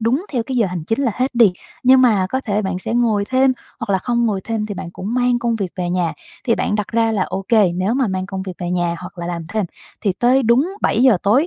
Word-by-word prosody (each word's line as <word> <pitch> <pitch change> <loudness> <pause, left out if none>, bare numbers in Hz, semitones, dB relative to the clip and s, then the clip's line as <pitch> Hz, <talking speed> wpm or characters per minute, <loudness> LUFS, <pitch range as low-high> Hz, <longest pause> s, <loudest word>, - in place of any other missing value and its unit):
đúng 255 - +1
theo 245 -4 0
cái 255 +2 -4
giờ 225 - +3
hành 180 -3 -5
chính 225 - -1
là 240 -6 +1
hết 255 +2 0
đi, 230 -6 +5 0.3
nhưng 260 +1 +6
mà 210 -7 +3
có 260 - 0
thể 210 -4 -1
bạn 190 -2 -2
sẽ 205 - -4
ngồi 225 -4 +2
thêm, 260 +3 +3 0.3
hoặc 225 - -4
là 190 - +3
không 235 +2 0
ngồi 205 -3 -1
thêm 225 -2 -2
thì 205 - -5
bạn 175 - -6
cũng 205 +5 -5
mang 245 -1 +2
công 235 -1 0
việc 195 -5 -3
về 175 -1 -2
nhà, 175 -2 0 0.3
thì 230 - +3
bạn 210 - -1
đặt 210 -3 -2
ra 225 +2 +1
là 200 - +1
ô 195 +1 -4
kê, 210 -6 +4
nếu 190 +5 0
mà 260 -2 +1
mang 185 -1 -2
công 190 -1 -5
việc 190 - -5
về 175 -1 -3
nhà, 175 -1 0
hoặc 180 0 -10
là 170 - -4
làm 170 -2 -4
thêm 215 +1 -1 0.4
thì 200 -4 +1
tới 250 +6 +3
đúng 245 +9 +3
7:00 240 0 +4
tối 245 +11 +3
220 Hz, 275 wpm, -19 LUFS, 190-245 Hz, 0.4 s, nhưng